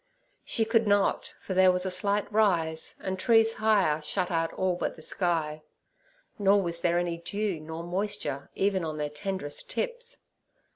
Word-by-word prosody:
She 225 - 0
could 225 0 +2
not, 205 -1 +1
for 190 - -3
there 185 0 +6
was 180 0 -1
a 190 - -1
slight 200 +3 +1
rise, 165 -7 +1
and 190 0 -3
trees 225 +2 +4
higher 200 -8 +3
shut 175 +5 -1
out 165 -1 0
all 185 -1 0
but - - -3
the 160 - -13
sky. 160 -5 -1 0.8
Nor 200 0 +4
was 170 -1 -3
there 175 0 +2
any 175 -1 -1
dew 200 0 -2
nor 160 +2 -7
moisture 175 -6 -3
even 195 -2 +1
on 155 -1 -3
their 150 -1 -2
tenderest 150 -1 -4
tips. 485 0 -3
185 Hz, 165 wpm, -28 LUFS, 165-205 Hz, 0.8 s, there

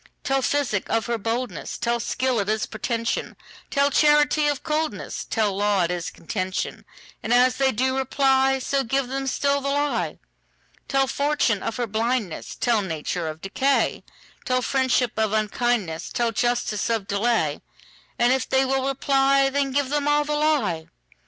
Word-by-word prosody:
Tell 270 0 +1
physic 265 -7 0
of 225 - +1
her 235 -1 -2
boldness; 225 -4 -3
Tell 235 0 0
skill 255 +1 0
it 200 0 -1
is 215 0 0
pretension; 230 +1 -3 0.3
Tell 280 0 +2
charity 295 +1 +4
of 290 -1 -1
coldness; 310 0 -2
Tell 210 -4 0
law 205 -2 +2
it 170 - 0
is 175 -1 -3
contention:And 185 +4 -5
as 250 +1 +4
they 270 -1 +3
do 260 +3 0
reply, 270 0 +2
So 270 +1 -1
give 265 +1 -1
them 270 +1 -3
still 280 +2 +1
the 275 - -2
lie. 290 +1 -1 0.7
Tell 270 -1 +2
fortune 280 -7 0
of - - -3
her 245 - -1
blindness; 225 -3 -2
Tell 235 -3 +1
nature 165 -1 -3
of 155 0 -6
decay; 265 +8 0 0.4
Tell 255 0 0
friendship 260 -2 +1
of 220 -1 +1
unkindness; 215 -5 -1
Tell 235 -1 0
justice 235 -2 0
of 225 -4 0
delay; 200 -7 0 0.6
And 240 +1 +4
if 265 -1 -1
they 265 0 +3
will 265 0 0
reply, 275 0 +2
Then 280 0 0
give 280 0 0
them 290 -1 0
all 295 0 +3
the 300 0 -3
lie. 275 - +1
250 Hz, 160 wpm, -24 LUFS, 215-275 Hz, 0.7 s, charity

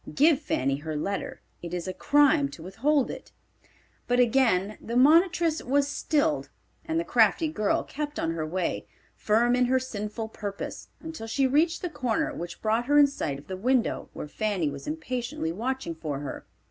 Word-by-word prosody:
Give 300 0 +4
Fanny 135 - 0
her 155 +1 -5
letter. 200 - -3 0.2
It 175 0 -5
is 175 +1 -4
a 185 - -3
crime 290 - +3
to 160 - -11
withhold 255 - +1
it." - - -10 0.8
But 245 0 +2
again 225 -5 +2
the 235 - -5
monitress 330 +3 +4
was 280 +2 +2
stilled, 300 +1 0 0.3
and 325 0 -1
the - - 0
crafty 245 +3 +3
girl 215 -9 0
kept 295 +1 -5
on 165 - -1
her 165 -1 -3
way, 175 +3 -2 0.3
firm 235 +3 +2
in 250 0 +3
her 260 +1 +3
sinful 220 -2 -5
purpose, 200 -2 -6
until 320 -8 -7
she 270 +4 +1
reached 315 +7 +2
the 355 - -1
corner 245 -7 -1
which 170 0 -7
brought 225 +2 +1
her 290 +1 +4
in 290 - +8
sight 160 - -3
of 140 - -13
the 190 - -5
window 245 +5 0
where - - -6
Fanny 185 -3 -1
was 140 0 -9
impatiently 255 - -3
watching 235 0 -3
for 155 -3 -4
her. 145 - -7
245 Hz, 180 wpm, -27 LUFS, 185-290 Hz, 0.8 s, in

